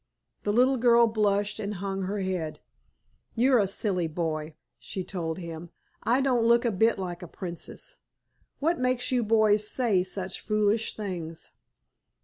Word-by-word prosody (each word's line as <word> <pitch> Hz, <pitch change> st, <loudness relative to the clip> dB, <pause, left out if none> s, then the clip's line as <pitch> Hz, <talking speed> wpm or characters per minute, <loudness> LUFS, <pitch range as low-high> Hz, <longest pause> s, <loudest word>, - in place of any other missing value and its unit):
The 205 Hz, -, 0 dB
little 255 Hz, +4 st, +4 dB
girl 235 Hz, -1 st, +6 dB
blushed 210 Hz, -2 st, +1 dB
and 210 Hz, -1 st, -3 dB
hung 195 Hz, +1 st, -3 dB
her 195 Hz, +2 st, -2 dB
head. 180 Hz, -5 st, -3 dB, 0.8 s
"You're 250 Hz, +1 st, +4 dB
a 200 Hz, -, +2 dB
silly 190 Hz, -3 st, -1 dB
boy," 160 Hz, -1 st, -3 dB, 0.2 s
she 190 Hz, -, -5 dB
told 165 Hz, -4 st, -4 dB
him. 170 Hz, -1 st, -7 dB, 0.3 s
"I 245 Hz, +4 st, +2 dB
don't 255 Hz, -4 st, +2 dB
look 235 Hz, +1 st, +4 dB
a 235 Hz, -, +2 dB
bit 220 Hz, +4 st, +3 dB
like 180 Hz, -2 st, -5 dB
a 180 Hz, -, -7 dB
princess. 175 Hz, -, -7 dB, 0.6 s
What 330 Hz, +4 st, 0 dB
makes 255 Hz, 0 st, +1 dB
you 250 Hz, -2 st, +2 dB
boys 215 Hz, -1 st, +3 dB
say 225 Hz, -8 st, +2 dB
such 185 Hz, 0 st, -4 dB
foolish 215 Hz, +1 st, +1 dB
things?" 175 Hz, -6 st, -5 dB
205 Hz, 150 wpm, -27 LUFS, 180-235 Hz, 0.8 s, girl